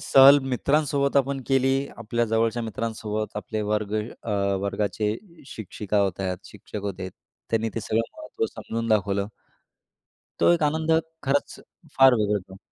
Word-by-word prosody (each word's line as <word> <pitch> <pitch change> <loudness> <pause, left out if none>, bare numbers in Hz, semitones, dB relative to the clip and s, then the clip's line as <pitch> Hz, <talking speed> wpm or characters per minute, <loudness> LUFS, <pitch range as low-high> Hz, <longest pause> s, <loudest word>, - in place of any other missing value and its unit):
सहल 140 +1 +8
मित्रांसोबत 140 +1 +1
आपण 140 0 +2
केली 135 0 +3 0.2
आपल्या 120 +1 -1
जवळच्या 115 +1 +1
मित्रांसोबत 110 -1 -3
आपले 110 +1 -3
वर्ग 105 0 -1 0.3
अ, 115 - -5 0.3
वर्गाचे 105 +1 -1 0.3
शिक्षिका 105 -3 -3
होत्या 95 -1 -1
शिक्षक 105 - -8
होते 95 -2 -4 0.4
त्यांनी 115 0 +1
ते 115 - -2
सगळं 110 +1 0 0.2
महत्त्व 345 +8 -3
समजून 115 0 -4
दाखवलं. 100 -2 +1 1.1
तो - - +5
एक 170 - +1
आनंद 160 +2 +1 0.3
खरंच 140 +1 0 0.4
फार 135 -1 +8
वेगळा 105 -2 +1
आहे - - -7
तो. 95 - -10
115 Hz, 135 wpm, -25 LUFS, 105-135 Hz, 1.1 s, सहल